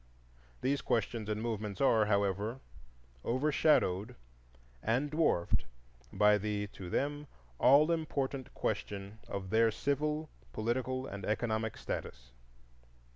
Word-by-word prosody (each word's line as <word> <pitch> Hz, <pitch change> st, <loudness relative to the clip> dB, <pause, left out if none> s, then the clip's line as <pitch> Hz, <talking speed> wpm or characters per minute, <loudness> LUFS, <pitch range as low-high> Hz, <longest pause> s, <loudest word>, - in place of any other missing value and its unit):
These 135 Hz, 0 st, +1 dB
questions 110 Hz, -1 st, -1 dB
and 105 Hz, 0 st, -1 dB
movements 105 Hz, -4 st, -3 dB
are, 115 Hz, -5 st, +4 dB
however, 100 Hz, +4 st, 0 dB, 0.6 s
overshadowed 125 Hz, -, +2 dB, 0.7 s
and 130 Hz, -, 0 dB
dwarfed 150 Hz, -, +2 dB, 0.5 s
by 105 Hz, +1 st, +4 dB
the 105 Hz, 0 st, -1 dB
(to 90 Hz, -2 st, -8 dB
them) 145 Hz, +7 st, -1 dB, 0.3 s
all 145 Hz, +5 st, +6 dB
important 140 Hz, -5 st, -2 dB
question 100 Hz, +1 st, -3 dB
of 95 Hz, -1 st, -5 dB
their 115 Hz, +1 st, +5 dB
civil, 150 Hz, +6 st, -1 dB, 0.2 s
political, 130 Hz, +3 st, -1 dB
and 100 Hz, -5 st, -7 dB
economic 110 Hz, +1 st, -1 dB
status. -, -, -6 dB
115 Hz, 105 wpm, -33 LUFS, 105-140 Hz, 0.7 s, all